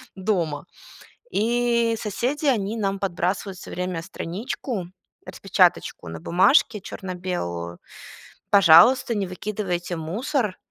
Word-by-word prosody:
дома. 175 -6 -1 0.7
И 235 +1 +1
соседи, 250 +9 -2
они 220 -4 +1
нам 195 -2 -1
подбрасывают 190 +1 -2
всё - - -10
время 180 -2 -3
страничку, 195 +3 -5 0.4
распечаточку - - +1
на 80 0 -6
бумажке 210 - +3
черно-белую: 175 - -5 0.7
"Пожалуйста, 200 +6 +6
не 200 -2 -1
выкидывайте 185 -2 -3
мусор, 210 - -2
195 Hz, 95 wpm, -24 LUFS, 175-225 Hz, 0.7 s, Пожалуйста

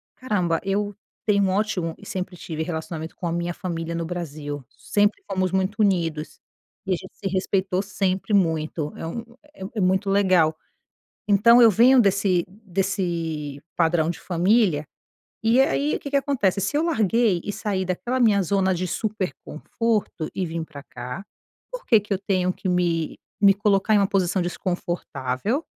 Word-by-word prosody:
"Caramba, 180 -9 0
eu 200 +1 -1 0.3
tenho 200 -2 +3
um 190 - +2
ótimo" 190 -4 0
e - - -13
sempre 185 -1 -4
tive 160 -2 -5
relacionamento 160 -1 -5
com - - -6
a - - -1
minha 170 +1 -2
família 170 -3 -4
no 165 0 -2
Brasil, 150 -4 -5
sempre 205 0 0
fomos 185 -2 0
muito 190 +2 0
unidos, 165 -6 0 0.5
e 190 - +1
a - - +3
gente 185 +2 -10
se 195 - -4
respeitou 190 0 0
sempre 195 0 -1
muito, 160 -5 +1
é - - -6
um 230 +8 -5 0.5
é - - -2
muito 190 +2 +2
legal. 185 -5 +3 0.7
Então, 230 +4 +6
eu 230 - +9
venho 250 +6 +6
desse 195 -4 +2
desse 175 -7 -3
padrão 165 -1 +2
de 175 - -4
família, 180 -3 +2 0.6
e 230 +3 +4
aí 145 - +1
o - - -3
que 280 - -6
que 280 - +2
acontece? 255 -9 +1
Se 200 +8 -1
eu 310 - +2
larguei 225 - +2
e 205 - -3
saí 195 -2 -2
daquela 235 +8 -2
minha 215 -5 +4
zona 190 +1 +1
de 180 +1 -2
super 205 -1 -2
conforto 210 -1 -2
e 190 - -1
vim 165 0 -3
pra 155 -3 -10
cá, 125 +6 -7 0.5
por - - -7
que 225 - +5
que 210 +1 -15
eu - - 0
tenho 185 -2 +1
que 185 - -4
me 170 -3 0 0.2
me 200 -1 +7
colocar 200 +1 +2
em - - +6
uma 200 -1 +3
posição 190 -1 +1
desconfortável 175 - -2
185 Hz, 170 wpm, -24 LUFS, 170-205 Hz, 0.7 s, eu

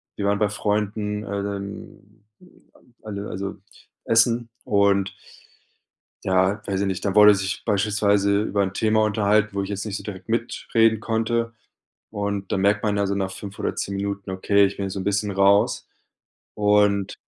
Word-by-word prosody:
wir 100 - -3
waren 100 0 +1
bei 105 -1 +2
Freunden, 105 0 -2
ähm, 100 +1 -6 0.2
m 180 - -19 0.3
m 120 - -25
alle 105 -1 -6
also, 100 +2 -5 0.5
Essen 115 +1 +3 0.2
und 100 -1 +2 1.1
ja, 95 +2 +1
weiß 95 -1 -1
ich 100 - 0
nicht, 95 -2 -3
dann 100 - 0
wurde 105 0 +8
sich 100 0 -3
beispielsweise 100 -1 +2
über 100 -2 0
'n 95 -1 -2
Thema 110 +1 +2
unterhalten, 105 0 +2
wo 100 - -1
ich 95 - -5
jetzt 100 -1 -4
nicht 105 -1 -4
so - - -10
direkt 95 -1 -8
mitreden 115 -1 +1
konnte. 115 +1 -1 0.6
Und 100 -2 -3
dann 95 - 0
merkt 105 +1 +2
man 105 -2 0
ja 100 0 +1
so 100 - -1
nach 95 -1 -2
5 100 +1 -9
oder - - -2
10 100 - -3
Minuten: 100 0 -4
„Okay, 100 +2 +3
ich 100 0 -1
bin 100 - -2
jetzt 95 - -5
so 100 - -4
'n - - -5
bisschen 100 +1 0
raus 100 +1 +3 0.7
und 105 -1 +2
100 Hz, 175 wpm, -23 LUFS, 100-105 Hz, 1.1 s, wurde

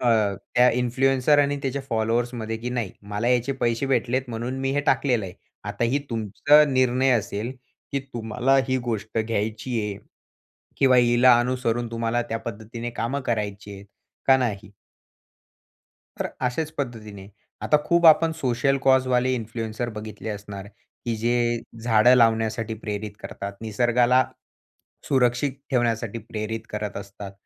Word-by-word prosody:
अ, 125 - -1 0.5
त्या 125 0 +6
इन्फ्लुएन्सर 130 +3 +2
आणि 145 0 +2
त्याच्या 135 0 -2
फॉलोवर्समध्ये, 115 0 -1
की 120 +2 -5
नाही 120 -6 -3 0.2
मला 105 +4 -1
याचे 125 +2 +2
पैसे 120 +3 0
भेटलेत 125 0 0
म्हणून 120 +3 -4
मी 135 0 0
हे 145 - +1
टाकलेलं 120 -7 +2
आहे. 90 - -8 0.3
आता 120 - -2
ही 130 +5 +1
तुमचा 115 +7 +4
निर्णय 130 0 +2
असेल, 105 +4 -4 0.4
की 140 - 0
तुम्हाला 125 0 0
ही 130 - +2
गोष्ट 110 0 -3
घ्यायची 110 +2 -2
आहे 105 -2 -3 0.8
किंवा 130 -2 +4
हिला 120 0 +5
अनुसरून 120 -2 -1
तुम्हाला 115 +1 -1
त्या 115 - -1
पद्धतीने 115 +2 -6
कामं 120 +4 -2
करायची 105 -2 -3
आहेत, 100 +1 -12 0.4
का 135 -1 +7
नाही? 105 -5 -3 1.5
तर - - -1 0.2
अशाच 155 +5 -2
पद्धतीने, 110 -7 -6 0.3
आता 150 - +4
खूप 170 -1 +4
आपण 160 +1 +6
सोशल 135 +2 +1
कॉज 130 -1 +5
वाले 130 0 +2
इन्फ्लुएन्सर 115 0 -4
बघितले 105 0 -7
असणार, 100 -1 -7 0.4
की 115 -2 -1
जे 120 +1 +1 0.2
झाडं 115 +1 +5
लावण्यासाठी 115 -1 +2
प्रेरित 105 -1 -5
करतात. 100 0 -6
निसर्गाला 120 +3 +3 0.8
सुरक्षित 130 0 +2 0.2
ठेवण्यासाठी 115 -3 0
प्रेरित 110 0 -5
करत 105 -1 -4
असतात. 100 0 -8
120 Hz, 140 wpm, -24 LUFS, 110-130 Hz, 1.5 s, का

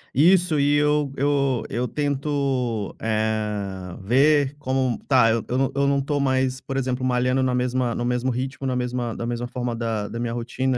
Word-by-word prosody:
Isso 170 +1 +4
e 145 +1 +3
eu 150 -1 +2
eu 140 -3 +1
eu 125 +1 -1
tento, 135 -5 -1
eh, 105 -4 -2
ver 140 +5 +3
como 130 -3 0
tá, 125 -5 +5
eu 115 0 0
não 135 0 +1
eu 140 0 +2
não 140 0 +2
tô 145 +1 -1
mais, 130 -1 0
por 135 -1 -4
exemplo, 130 -1 -1
malhando 125 +1 +1
na 130 -1 +1
mesma 125 -1 0
no 120 - -2
mesmo 125 +1 0
ritmo, 130 +2 -3
na 130 - -1
mesma 125 -2 -2
na 115 - -4
mesma 120 0 -3
forma 120 -1 -3
da 110 -3 -2
da 115 +2 -6
minha 120 -1 -2
rotina, 125 +2 -1
130 Hz, 185 wpm, -23 LUFS, 120-140 Hz, -, tá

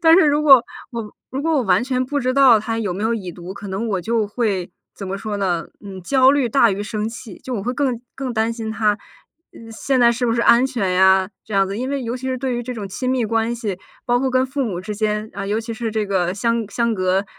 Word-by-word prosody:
但 325 -1 +6
是 345 - +5
如 295 +1 +2
果 270 -5 +7 0.3
我 230 -3 -6 0.2
如 265 - -3
果 325 +3 0
我 285 -5 +2
完 190 +2 +2
全 255 0 0
不 285 +3 -2
知 255 -1 0
道 265 -5 +7
他 225 +2 -3
有 205 -5 -2
没 195 +4 -3
有 230 +1 +1
已 190 -5 -5
读， 175 +2 -9
可 200 0 -8
能 195 +5 -3
我 200 -4 -1
就 225 +3 0
会 205 -4 -1 0.2
怎 195 - -8
么 190 - -3
说 210 +1 -4
呢？ 180 -4 -1 0.2
嗯， 190 -2 -8
焦 265 +6 +4
虑 280 -4 +1
大 230 -2 +4
于 200 +2 -3
生 215 0 -3
气， 225 -2 -10
就 255 - -6
我 200 - -3
会 245 - -2
更 255 -3 -1 0.2
更 265 -2 -3
担 220 +1 +1
心 225 -1 -5
他， 215 -1 +1 0.5
嗯， 225 0 -12
现 260 +4 0
在 235 -1 +6
是 245 +2 -2
不 230 - +1
是 235 - +1
安 235 +2 +6
全 235 -9 -1
呀 190 0 +4 0.2
这 - - -11
样 195 -1 +3
子。 195 +1 -4
因 255 +4 -3
为 280 -1 -2
尤 235 +1 -3
其 260 +1 -5
是 260 0 -2
对 260 -1 -2
于 240 - -2
这 250 - -5
种 215 -4 -5
亲 255 +6 -3
密 255 -2 +1
关 225 +1 0
系， 215 -6 -4 0.3
包 245 0 +3
括 265 0 0
跟 255 0 +2
父 275 +1 -2
母 190 -7 -3
之 210 +3 -5
间， 210 0 -1
啊， 200 - -4
尤 210 +2 0
其 230 0 -6
是 230 -1 -3
这 215 -1 -1
个 180 -3 0
相 230 +2 0
相 235 -1 0
隔 185 0 +1
225 Hz, 290 characters per minute, -20 LUFS, 200-255 Hz, 0.5 s, 果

